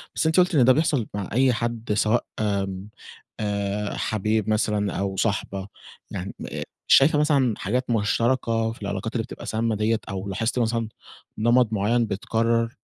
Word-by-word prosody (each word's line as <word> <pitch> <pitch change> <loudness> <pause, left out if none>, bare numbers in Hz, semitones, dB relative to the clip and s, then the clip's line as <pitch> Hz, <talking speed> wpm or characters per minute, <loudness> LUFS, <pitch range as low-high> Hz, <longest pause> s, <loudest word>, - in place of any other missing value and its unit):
بس - - 0
أنتِ 160 +3 +3
قُلتِ 180 -2 +3
إن 125 -4 +5
ده 130 - +7
بيحصل 145 -6 +1
مع 100 -2 -4
أي 130 0 +4
حد 115 -1 -2
سواء 110 +3 +2
آمم 100 -1 -2 0.5
آآ، 100 0 -2
حبيب 110 0 0
مثلًا 105 -2 +1
أو 100 -1 -2
صاحبة، 100 -2 -1 0.4
يعني 95 0 -5 0.2
آآ - - -4 0.2
شايفة 150 +2 +6
مثلًا 140 -6 +3
حاجات 125 +7 -2
مشتركة 115 0 +1
في 115 - -12
العلاقات 100 +2 -3
اللي 115 -2 -1
بتبقى - - -9
سامة 110 0 0
ديّة، 110 +1 +1
أو 95 0 -4
لاحظتِ 115 +6 -1
مثلًا 115 -1 0 0.5
نمط 120 0 +3
معيّن 115 +3 +2
بيتكرر؟ 115 +3 0
110 Hz, 160 wpm, -24 LUFS, 100-120 Hz, 0.5 s, ده